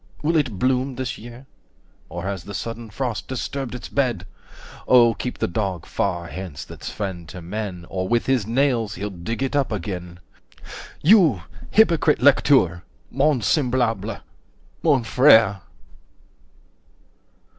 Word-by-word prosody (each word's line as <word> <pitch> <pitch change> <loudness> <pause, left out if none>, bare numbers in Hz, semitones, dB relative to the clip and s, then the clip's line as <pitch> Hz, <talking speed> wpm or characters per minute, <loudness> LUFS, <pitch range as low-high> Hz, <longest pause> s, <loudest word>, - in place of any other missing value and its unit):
Will 165 +3 +1
it 135 -10 +1
bloom 130 +3 0
this 130 -1 -4
year? 120 +3 -11 0.6
Or 85 +2 -6
has 95 -3 -4
the 100 - -7
sudden 115 +1 -5
frost 120 +1 -4
disturbed 130 0 -4
its 125 - -7
bed? 120 -9 -1 0.6
Oh 120 -2 +6
keep 125 +3 -5
the - - 0
Dog 95 -2 -3
far 85 0 -2
hence, 90 -4 -7
that's - - -8
friend 90 -6 -5
to 90 - -8
men, 90 0 -5
Or 95 0 -3
with 120 +2 +1
his 130 -6 +1
nails 115 -3 +1
he'll 105 +1 -4
dig 105 +8 -4
it 135 +2 -2
up 140 -4 +1
again! 90 -3 -5 0.4
75 - - -11 0.2
You! 165 - +5 0.3
hypocrite 170 -8 +4
lecteur!—mon 135 - +2
semblable,—mon 120 - -1
frère!" 110 -5 +5
115 Hz, 130 wpm, -22 LUFS, 95-130 Hz, 0.6 s, Oh